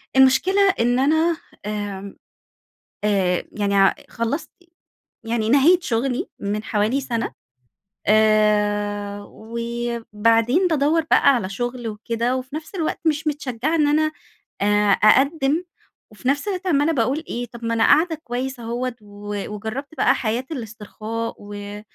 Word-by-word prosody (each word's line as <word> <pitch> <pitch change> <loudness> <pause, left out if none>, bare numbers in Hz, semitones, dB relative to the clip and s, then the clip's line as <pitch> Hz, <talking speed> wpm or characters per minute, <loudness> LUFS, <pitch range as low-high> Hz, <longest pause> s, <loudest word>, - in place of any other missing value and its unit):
المشكلة 370 +10 +5
إن 245 +2 +2
أنا 315 +4 +2 0.3
آمم 205 -2 -5 0.9
آآ، 190 -4 +1
يعني 200 -1 -1
ع 195 -1 +5
خلّصت 230 +7 -3 0.8
يعني 225 -1 -1
نهيت 315 +7 +5
شغلي 245 -1 -1
من 210 +2 -3
حوالي 220 +6 0
سنة 235 -4 -3 0.8
آآ، 210 -1 +2
وبعدين 235 - 0
بادوّر 315 +1 +2
بقى 280 -2 +6
على 190 -5 -2
شغل 240 +3 -4
وكده، 230 +3 -2
وفي 255 +2 -7
نفس 315 +4 -7
الوقت 325 -4 -2
مش 315 0 +1
متشجعة 285 0 -1
إن 300 -3 +3
أنا 310 +1 +2 0.5
آآ، 205 0 +3
أقدِّم 275 - +3 0.5
وفي 215 +4 -7
نفس 285 +9 +1
الوقت 380 -1 -3
عمَّالة 295 -1 +3
باقول 270 +4 0
إيه 245 +1 -3
طب 235 0 -9
ما 230 - 0
أنا 225 0 +2
قاعدة 325 +1 +4
كويس 255 +2 -4
أهوَّة، 240 +2 -3
ووجرّبت 210 +7 -6
بقى - - +4
حياة 235 +3 -2
الإسترخاء 225 -2 -5
و 205 0 -8
235 Hz, 130 wpm, -22 LUFS, 210-280 Hz, 0.9 s, بقى